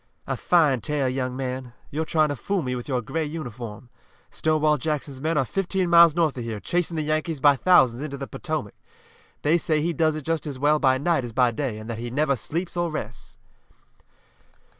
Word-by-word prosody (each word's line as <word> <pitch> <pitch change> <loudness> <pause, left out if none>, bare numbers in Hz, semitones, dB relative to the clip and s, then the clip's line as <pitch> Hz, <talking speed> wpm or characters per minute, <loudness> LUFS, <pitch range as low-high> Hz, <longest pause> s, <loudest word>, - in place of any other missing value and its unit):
"A - - -2
fine 150 -8 +3
tale, 145 0 -1
young 130 0 -2
man. 130 -2 -4 0.2
You're 160 +3 -2
trying 155 -1 +2
to 145 - -2
fool 190 - -2
me 125 -1 -2
with 120 - -6
your 130 -4 -1
gray 160 +8 -2
uniform. 125 -7 -7 0.4
Stonewall 155 -1 +1
Jackson's 145 -3 -3
men 160 +1 0
are 135 - +2
fifteen 185 - -1
miles 170 -2 +7
north 165 -4 +2
of - - -4
here, 115 -2 -4
chasing 170 - -1
the 155 - 0
Yankees 155 0 -1
by 145 +1 +6
thousands 130 -6 +4
into 145 -2 -5
the 135 - -5
Potomac. 155 - -4 0.7
They 160 +4 +3
say 155 -1 +1
he 170 +3 0
does 155 0 +1
it 155 - -5
just 165 +1 -2
as 140 -3 -5
well 150 +3 +3
by 130 -2 +3
night 155 0 +1
as 120 -2 -6
by 125 0 +3
day, 120 -2 -3
and 110 0 -9
that 115 -1 -5
he 120 +1 -4
never 140 +2 +1
sleeps 170 - -4
or 175 -1 0
rests." 155 -6 -7
150 Hz, 205 wpm, -24 LUFS, 130-160 Hz, 0.7 s, miles